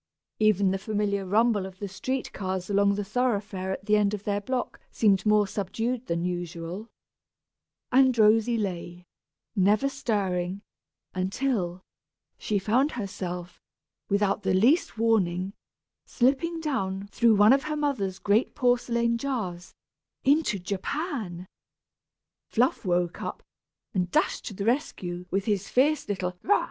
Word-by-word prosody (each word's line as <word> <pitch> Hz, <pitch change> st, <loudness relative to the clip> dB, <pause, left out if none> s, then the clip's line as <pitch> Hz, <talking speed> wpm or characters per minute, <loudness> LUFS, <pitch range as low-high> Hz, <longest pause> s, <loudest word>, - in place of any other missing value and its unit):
Even 205 Hz, -3 st, +3 dB
the 195 Hz, -, -1 dB
familiar 200 Hz, -1 st, -1 dB
rumble 210 Hz, -1 st, +2 dB
of 190 Hz, -1 st, -12 dB
the 200 Hz, -, -5 dB
street 250 Hz, +8 st, -3 dB
cars 185 Hz, 0 st, -3 dB
along 200 Hz, 0 st, +3 dB
the 205 Hz, -, -2 dB
thoroughfare 205 Hz, -4 st, -1 dB
at 195 Hz, -, -5 dB
the 210 Hz, 0 st, +3 dB
end 210 Hz, 0 st, +2 dB
of 205 Hz, -, -9 dB
their 205 Hz, -1 st, -1 dB
block 255 Hz, +3 st, -3 dB
seemed 200 Hz, -2 st, +2 dB
more 210 Hz, -1 st, +5 dB
subdued 225 Hz, +6 st, -3 dB
than 170 Hz, 0 st, -1 dB
usual; 175 Hz, +3 st, -5 dB, 1.0 s
and 260 Hz, -1 st, +5 dB
Rosy 225 Hz, +2 st, +4 dB
lay, 180 Hz, -3 st, -4 dB, 0.5 s
never 205 Hz, +6 st, +3 dB
stirring, 200 Hz, -7 st, -2 dB, 0.5 s
until 185 Hz, -1 st, -1 dB, 0.6 s
she 210 Hz, -, 0 dB
found 240 Hz, +9 st, +2 dB
herself, 180 Hz, -5 st, -5 dB, 0.5 s
without 200 Hz, +1 st, +1 dB
the 190 Hz, -1 st, +1 dB
least 245 Hz, -, +3 dB
warning, 195 Hz, -4 st, +1 dB, 0.5 s
slipping 285 Hz, +7 st, +1 dB
down 200 Hz, -11 st, -2 dB
through 230 Hz, -2 st, +4 dB
one 205 Hz, +4 st, +7 dB
of 275 Hz, +1 st, +1 dB
her 305 Hz, 0 st, -2 dB
mother's 255 Hz, -11 st, -1 dB
great 205 Hz, +5 st, +1 dB
porcelain 235 Hz, -3 st, +1 dB
jars, 210 Hz, -10 st, -4 dB, 0.5 s
into 285 Hz, -5 st, +3 dB
Japan! 195 Hz, -, -4 dB, 1.0 s
Fluff 250 Hz, +3 st, +1 dB
woke 175 Hz, -1 st, 0 dB
up, -, -, -5 dB, 0.5 s
and 180 Hz, -2 st, 0 dB
dashed -, -, 0 dB
to 205 Hz, -, -6 dB
the 200 Hz, -, -3 dB
rescue, 180 Hz, -, -2 dB
with 195 Hz, +1 st, -1 dB
his 200 Hz, -3 st, -1 dB
fierce 285 Hz, +2 st, +2 dB
little 185 Hz, -2 st, -2 dB
"Rah!" 410 Hz, -, +3 dB
205 Hz, 135 wpm, -27 LUFS, 185-240 Hz, 1.0 s, one